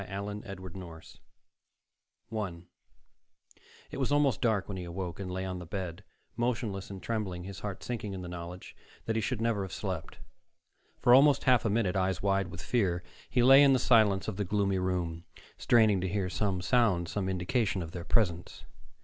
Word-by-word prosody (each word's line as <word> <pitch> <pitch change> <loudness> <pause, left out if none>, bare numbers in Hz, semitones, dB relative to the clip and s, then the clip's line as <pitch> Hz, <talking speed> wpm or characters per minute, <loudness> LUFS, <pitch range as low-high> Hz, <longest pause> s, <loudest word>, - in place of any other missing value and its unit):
The - - -8 0.4
Dark 95 -2 -8
Door 85 -4 -9 1.3
1 95 -6 -4 1.3
It - - -6
was 135 -2 -1
almost 145 -7 +2
dark 110 -5 +1
when 100 - -5
he 90 - -5
awoke, 90 +1 -5
and 95 -2 -5
lay 95 +1 -3
on 90 -1 -4
the 90 - -8
bed, 95 0 -5 0.3
motionless 115 -5 -2
and 95 -2 -8
trembling, 100 -6 -3
his 95 -1 -8
heart 100 +1 -6
sinking 110 -5 -4
in 95 - -6
the - - -6
knowledge 90 +1 -8 0.3
that 110 - -1
he 110 - +1
should 120 +2 -2
never 115 -3 +1
have 95 -1 -5
slept. 95 -6 -5 0.8
For 120 - +4
almost 140 +2 +6
half 125 -3 +4
a - - +2
minute, 100 -3 +1
eyes 95 -2 0
wide 100 -1 +1
with 85 -2 -9
fear, 90 -8 0 0.3
he 125 - +2
lay 135 +2 +8
in 140 -1 +6
the - - +4
silence 110 -7 +3
of - - -3
the 105 - 0
gloomy 100 0 0
room, 90 -2 -2 0.3
straining 110 -5 +4
to 95 - -1
hear 95 -1 -1
some 95 -4 -1
sound, 105 -8 +2
some 95 +1 -2
indication 95 +1 0
of 80 - -8
their 85 -1 -6
presence. 90 -4 0
95 Hz, 185 wpm, -30 LUFS, 90-110 Hz, 1.3 s, lay